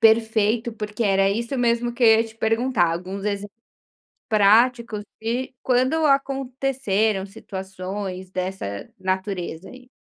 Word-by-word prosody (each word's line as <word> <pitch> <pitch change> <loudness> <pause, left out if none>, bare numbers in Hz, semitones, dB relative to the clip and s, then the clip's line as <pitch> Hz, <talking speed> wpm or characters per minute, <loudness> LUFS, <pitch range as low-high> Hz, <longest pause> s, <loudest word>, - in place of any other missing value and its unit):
Perfeito, 225 +1 +3
porque 210 +1 -4
era 195 -1 +3
isso 235 +5 -2
mesmo 240 0 +1
que 240 +1 0
eu 225 - +8
ia 230 - +1
te 225 0 -12
perguntar, 225 -6 +2
alguns 185 +4 -5
exemplos 205 +1 -3 0.7
práticos, 220 +1 +3 0.2
de 245 +4 -2
quando 260 +6 +2
aconteceram 265 -7 +1
situações 190 -1 -6
dessa 185 - -4
natureza, 185 -2 -3
aí? 255 0 -14
220 Hz, 120 wpm, -23 LUFS, 195-240 Hz, 0.7 s, eu